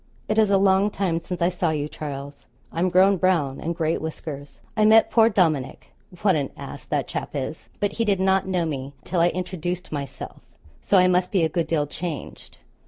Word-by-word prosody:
It 215 +1 +1
is 215 -2 +4
a 200 - +4
long 195 +1 +4
time 185 -5 -1
since 175 +1 -4
I 175 - +4
saw 175 -2 -1
you, 150 -2 -1
Charles; 145 -2 -7 0.2
I'm 175 +3 0
grown 190 +2 +5
brown, 165 -7 +1
and 170 +1 -3
great 160 -1 0
whiskers. 145 -3 -7 0.2
I 215 - +2
met 220 +1 +6
poor 225 -1 +5
Dominick 160 - 0 0.3
what 195 -4 +4
an 140 -3 -1
ass - - -9
that - - -1
chap - - -5
is 140 +3 -5
but 205 -1 0
he 230 - -1
did 200 -4 +1
not 190 0 +2
know 180 -3 0
me 140 -3 -4
till 180 0 -2
I 170 +1 +5
introduced 180 0 -4
myself, 140 -2 -6 0.4
so 200 - +3
I 185 0 +6
must 180 0 +2
be 190 -5 +2
a 160 - +2
good 170 -1 -1
deal 150 -3 +1
changed. 155 +1 -7
175 Hz, 205 wpm, -24 LUFS, 155-190 Hz, 0.4 s, met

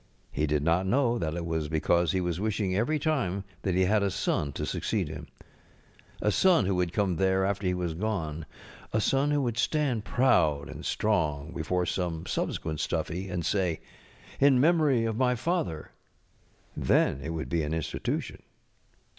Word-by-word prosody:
He 75 +1 0
did 75 -1 0
not 85 +4 +2
know 120 +1 +2
that 80 -1 -2
it 85 -1 -3
was 80 -2 -2
because 80 +1 +2
he 95 - 0
was 90 -1 -2
wishing 105 -2 -1
eVery 120 +11 +1
time 125 - 0 0.2
that 95 -3 -1
he 95 0 +3
had 105 +2 +3
a 100 - +1
son 75 -5 -1
to - - -3
succeed - - -1
him. - - -8 1.0
A 105 - +3
son 180 - +4
who 95 - +1
would 90 -2 0
come 95 -3 0
there 95 +1 +2
after 100 -1 -1
he 90 - +1
was 90 -2 -2
gone 80 -5 -3
ŌĆö - - -19
a 110 - +2
son 135 +6 +2
who 145 -1 +1
would 120 -2 -2
stand 135 -5 +1
proud 80 - +2
and - - -8
strong 80 -8 0
before 90 +2 -1
some 85 -3 -2
subsequent 80 -2 -2
Stuffy, 95 +3 -2
and 90 -2 -3
say: 90 -5 0 0.6
ŌĆ£In 140 0 +6
memory 145 -5 +3
of 110 -1 -2
my 125 0 +2
father. 120 - -2 0.9
ŌĆØ - - -4
Then 70 - +3
it 75 - -5
would 80 -1 -3
be 85 -1 +1
an 75 0 -3
Institution. 80 - -3
95 Hz, 180 wpm, -28 LUFS, 80-115 Hz, 1.0 s, ŌĆ£In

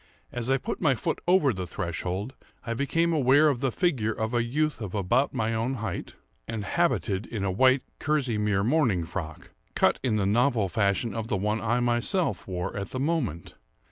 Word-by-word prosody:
As 120 0 -3
I 135 - +4
put - - -5
my 135 -4 +3
foot - - -2
over 175 -8 +4
the 95 -2 -5
threshold, 90 +7 -4 0.3
I 115 - -2
became 165 +7 +1
aware 145 +1 +5
of 135 -4 -1
the 135 -1 0
figure 120 -8 0
of 110 +2 -3
a 120 - +2
youth 150 +1 -1
about 105 +6 0
my 110 +1 -1
own 115 +4 -1
height, 110 -7 -5 0.3
and 110 -3 -4
habited 115 - 0
in 110 -4 -4
a 95 - 0
white 130 +6 +4 0.2
kerseymere 110 -9 0
morning 120 - +2
frock, 80 -2 -7 0.2
cut - - +3
in 120 -5 0
the 105 -2 +1
novel 115 0 +2
fashion 100 +4 0
of 115 -1 -4
the 105 - 0
one 105 +3 -1
I 120 +2 +1
myself 120 - 0
wore 90 -1 -3
at 100 -1 -4
the 130 - -4
moment. 130 - -2
115 Hz, 185 wpm, -27 LUFS, 100-135 Hz, 0.3 s, aware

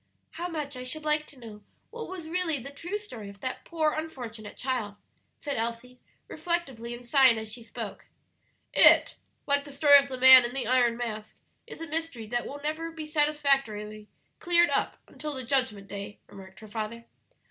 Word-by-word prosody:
"How 345 +2 -5
much 300 -5 -4
I 250 - -6
should 305 +5 -4
like 305 0 +1
to 285 - -15
know 220 -4 -11 0.3
what 465 0 -7
was 360 -4 -7
really 335 -2 0
the 275 +2 -8
true 345 +8 -5
story 240 - -9
of 200 0 -13
that 255 - -5
poor 315 -2 0
unfortunate 245 -10 -7
child," 245 -6 -2 0.4
said 285 -2 -4
Elsie, 235 +2 -4 0.3
reflectively, 270 -10 -3
and 245 +1 -12
sighing 260 -2 +5
as 220 -1 -6
she 240 - -8
spoke. 225 - -8 0.7
"It - - +6 0.3
like 285 0 +3
the 285 - -11
story 285 0 +7
of 280 - -3
the 260 - -5
Man 260 0 +10
in 240 +2 -4
the 270 - -2
Iron 240 -1 +3
Mask 220 -3 -5 0.3
is - - -10
a 330 - -5
mystery 320 -7 -4
that 240 +1 -2
will 285 - -7
never 315 +2 -3
be 325 -1 -7
satisfactorily 275 -9 0 0.3
cleared 345 0 +3
up - - 0
until 300 -1 -6
the 260 - -4
Judgment 255 -6 0
Day," 200 0 -7
remarked 190 -2 -13
her 215 - -11
father. 220 +2 -5
260 Hz, 185 wpm, -28 LUFS, 230-305 Hz, 0.7 s, Man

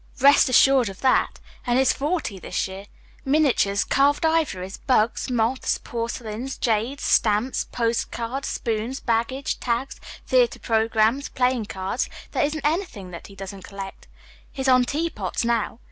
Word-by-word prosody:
Rest 280 0 +6
assured 255 -2 +5
of 195 - -11
that 260 - +2 0.3
and 240 0 +2
he's 265 -1 +4
forty 290 - -2
this - - -2
year. 190 +1 -9 0.4
Miniatures, 270 -9 +2
carved 285 +3 +2
ivories, 245 - 0
bugs, 240 0 +1
moths, 245 +1 0
porcelains, 235 +1 -5
jades, 235 +4 -1
stamps, 215 +4 +2
postcards, 235 +2 -2
spoons, 230 +4 -2
baggage 235 +4 -1
tags, 245 +2 -2 0.2
theatre - - +3
programs, 225 +3 +1
playing 250 -3 0
cards 190 +4 -3 0.2
there - - +1
isn't 295 0 -2
anything 300 - -2
that 170 - -9
he 195 - -14
doesn't 195 -1 -8
collect. 195 -1 -9 0.4
He's 265 -1 -3
on 255 -1 +5
teapots, 280 - -2
now. 230 -1 0
240 Hz, 135 wpm, -24 LUFS, 215-275 Hz, 0.4 s, Rest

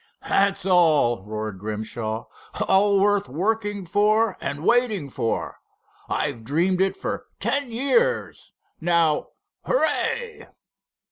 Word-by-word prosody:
"That's 195 -2 +2
all!" 155 - +3
roared 110 -2 -5
Grimshaw—"all 115 - -1
worth 205 -6 +2
working 205 - -2
for 210 +3 +2
and 145 +2 -4
waiting 220 - +2
for. 115 - -3 0.5
I've 115 - -2
dreamed 175 +9 +1
it 195 0 +1
for - - -4
ten 255 +4 0
years. 470 - 0 0.3
Now—hooray!" 415 - 0
190 Hz, 90 wpm, -23 LUFS, 140-220 Hz, 0.5 s, all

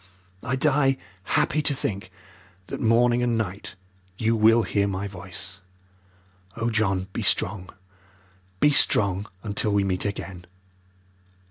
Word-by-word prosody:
I 125 +1 -2
die 135 -1 +2 0.3
happy 155 +8 +1
to 145 -1 +1
think 100 -6 -4 0.5
that - - -6
morning 120 +2 +3
and 120 -2 +1
night 100 -3 -4 0.4
you 115 +1 +1
will 115 +1 +5
hear 100 -2 0
my 100 +1 -3
voice. 95 -1 -10 1.0
Oh, 115 0 -1
John, 95 -4 0
be - - -3
strong, 100 -2 +1 0.9
be 145 - +4
strong, 100 -7 +3 0.2
until 105 0 0
we 100 -1 +2
meet 95 -1 -1
again." 95 -3 -5
105 Hz, 125 wpm, -24 LUFS, 95-120 Hz, 1.0 s, will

